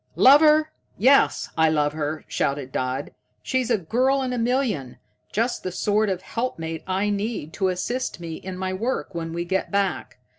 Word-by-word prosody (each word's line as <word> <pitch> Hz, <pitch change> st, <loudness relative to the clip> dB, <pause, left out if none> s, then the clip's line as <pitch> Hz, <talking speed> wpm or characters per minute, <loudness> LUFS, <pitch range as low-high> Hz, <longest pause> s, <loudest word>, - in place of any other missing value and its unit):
"Love 280 Hz, +3 st, +7 dB
her? 310 Hz, 0 st, +5 dB, 0.3 s
Yes, 270 Hz, +6 st, +4 dB
I 160 Hz, 0 st, +4 dB
love 150 Hz, -1 st, +1 dB
her," 155 Hz, 0 st, -3 dB
shouted 140 Hz, -2 st, -2 dB
Dodd. 130 Hz, +2 st, -2 dB, 0.3 s
"She's 255 Hz, -2 st, 0 dB
a 230 Hz, -, +3 dB
girl 255 Hz, +9 st, +1 dB
in 255 Hz, -1 st, -2 dB
a -, -, -2 dB
million. 230 Hz, -, -1 dB, 0.3 s
Just 230 Hz, +4 st, 0 dB
the 185 Hz, -, -4 dB
sort 210 Hz, +3 st, +1 dB
of 185 Hz, -1 st, -3 dB
helpmate 165 Hz, -10 st, -4 dB
I 195 Hz, +2 st, 0 dB
need 205 Hz, -6 st, -3 dB
to 190 Hz, -, 0 dB
assist 215 Hz, +6 st, -2 dB
me 165 Hz, -2 st, -6 dB
in 185 Hz, -1 st, -7 dB
my 185 Hz, 0 st, -2 dB
work 225 Hz, +1 st, -2 dB
when 165 Hz, -1 st, -4 dB
we 170 Hz, +1 st, -3 dB
get 190 Hz, +2 st, -1 dB
back. 200 Hz, -1 st, -1 dB
190 Hz, 180 wpm, -24 LUFS, 165-245 Hz, 0.3 s, Love